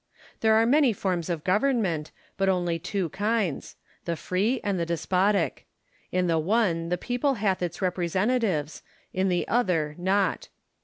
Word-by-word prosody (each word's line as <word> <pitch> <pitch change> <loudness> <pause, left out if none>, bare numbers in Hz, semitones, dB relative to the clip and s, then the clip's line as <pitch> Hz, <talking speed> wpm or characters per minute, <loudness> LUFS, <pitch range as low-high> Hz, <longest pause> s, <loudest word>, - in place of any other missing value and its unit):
There 220 -1 +4
are 225 +1 +4
many 270 0 +4
forms 185 -4 -2
of 165 -3 -2
government, 190 - +1 0.3
but 195 -1 +1
only 175 -3 0
two 185 0 -2
kinds; 205 -4 -1 0.3
the 170 - -1
free 205 +10 0
and 200 -3 -1
the - - +1
despotic: 185 +5 0 0.4
in 180 0 +1
the 165 -2 +2
one 170 -2 +1
the 180 - 0
people 250 +7 0
hath 200 -4 0
its 175 +2 -3
representatives, 185 - 0 0.3
in 190 +1 +1
the 175 -1 0
other 180 -11 +1
not. 190 +2 +1
185 Hz, 150 wpm, -26 LUFS, 170-215 Hz, 0.4 s, There